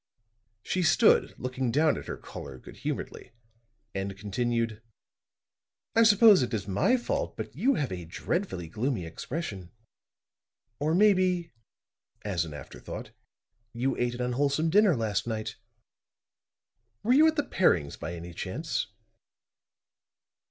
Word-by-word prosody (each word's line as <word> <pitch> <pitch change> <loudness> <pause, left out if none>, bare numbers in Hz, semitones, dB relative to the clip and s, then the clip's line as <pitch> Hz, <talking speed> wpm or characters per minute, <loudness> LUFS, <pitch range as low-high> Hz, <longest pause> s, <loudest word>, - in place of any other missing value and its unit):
She 185 - -1
stood 175 +7 +4
looking 130 0 -2
down 155 +4 +3
at - - -7
her - - -4
caller, 65 - -9
good - - -13
humoredly - - -5 0.6
and 95 0 -4
continued: 115 +2 -1 1.1
"I 230 - +6
suppose 215 - +7
it 120 -2 -1
is 100 -2 -4
my 105 - +3
fault, 240 - -3
but - - -6
you 270 +1 +2
have 140 - -1
a 90 -2 -5
dreadfully 90 - -3
gloomy 110 - -2
expression. 100 - -5 1.1
Or 155 +3 +1
maybe," 185 -4 +3 0.7
as 90 -6 -1
an 80 - -8
afterthought, 75 - -8 0.6
"you 130 +3 0
ate 120 0 -1
an 125 - -5
unwholesome 140 +6 +1
dinner 200 -3 +5
last 110 -2 -1
night. 110 -2 -4 1.5
Were 240 - +3
you 305 +4 +7
at 315 - +2
the 295 - +1
Perrings, 85 - +2
by 85 - -6
any 85 +1 -8
chance?" - - -3
125 Hz, 130 wpm, -28 LUFS, -, 1.5 s, suppose